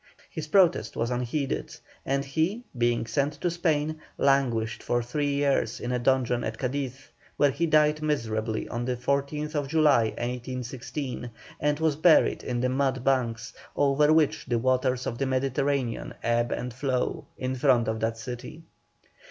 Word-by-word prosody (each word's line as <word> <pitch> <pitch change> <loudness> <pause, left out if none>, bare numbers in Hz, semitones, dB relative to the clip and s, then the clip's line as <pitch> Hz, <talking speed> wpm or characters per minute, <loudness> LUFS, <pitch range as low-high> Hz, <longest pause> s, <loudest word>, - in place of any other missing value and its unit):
His 160 -4 -5
protest 180 0 +3
was 115 +1 -1
unheeded, 125 +3 -2 0.3
and 140 +1 0
he, 160 - -1
being 120 -1 +1
sent 140 +4 0
to 170 +4 -2
Spain, 155 -2 0 0.2
languished 120 -5 +1
for 120 0 0
three 145 +4 -1
years 140 0 +1
in 120 - -3
a 125 - 0
dungeon 125 -1 +1
at 110 0 -3
Cadiz, 135 +1 -4 0.3
where 145 -1 +4
he 170 +5 0
died 150 0 +3
miserably 115 -7 -1
on 120 +1 -3
the 125 0 -1
14th 140 +3 -1
July, 150 -6 +4
1816, 125 +2 -4 0.3
and 150 0 +1
was 160 -2 +2
buried 160 +2 +4
in 120 -1 -2
the 125 - +1
mud 130 -1 0
banks, 120 -4 0 0.2
over 145 +1 +3
which 155 -4 +2
the 120 -2 +1
waters 130 +1 +1
of 120 - -4
the 135 - 0
Mediterranean 135 -1 -1
ebb 120 0 +1
and 125 0 -3
flow, 130 0 -1
in 130 0 -2
front 125 -3 +3
of 110 0 -1
that 115 0 -1
city. 125 +7 -7
130 Hz, 155 wpm, -27 LUFS, 120-145 Hz, 0.3 s, where